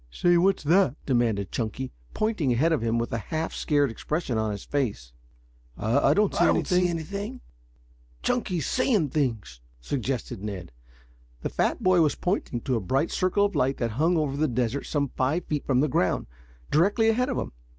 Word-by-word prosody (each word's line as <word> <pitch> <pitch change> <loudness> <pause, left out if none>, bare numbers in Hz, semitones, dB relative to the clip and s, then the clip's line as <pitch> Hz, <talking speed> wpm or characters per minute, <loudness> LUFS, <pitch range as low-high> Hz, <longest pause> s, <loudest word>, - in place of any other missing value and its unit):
"Say, 175 - +2
what's 190 +1 +3
that?" 165 -2 +3
demanded 115 -7 +1
Chunky, 125 +3 -3 0.2
pointing 215 - 0
ahead 155 +8 +3
of 155 - 0
him, 115 0 0
with 115 0 -2
a 115 - 0
half 155 +10 -3
scared 145 -4 +1
expression 150 +3 -3
on 110 -1 0
his 105 -1 -5
face. 105 - -2 0.6
"I 115 +6 +2
don't 210 -1 +2 0.3
see 180 0 +3
anything," - - -2
answered 165 -2 -3
the 200 - -3
other - - -3
lads. 255 - -12 0.8
"Chunky's 190 - 0
'seeing 220 - +1
things,'" 110 - -2 0.2
suggested 125 - -3
Ned. 100 - -6 0.7
The - - -1
fat - - -1
boy 185 -2 +5
was 150 -3 +2
pointing 175 - -2
to 130 - -1
a - - +1
bright 135 - 0
circle 185 +2 +2
of 205 - -2
light 135 +2 +1
that 115 -2 -1
hung 160 +9 +2
over 145 -3 0
the 155 +2 +1
desert 125 +1 -1
some 140 -2 0
five 140 +9 -1
feet 150 -2 -3
from 130 -2 +3
the 150 - +2
ground, 95 -9 +1 0.5
directly 205 +8 +3
ahead 250 +4 +1
of 255 - -2
him. - - -3
145 Hz, 190 wpm, -26 LUFS, 115-175 Hz, 0.8 s, boy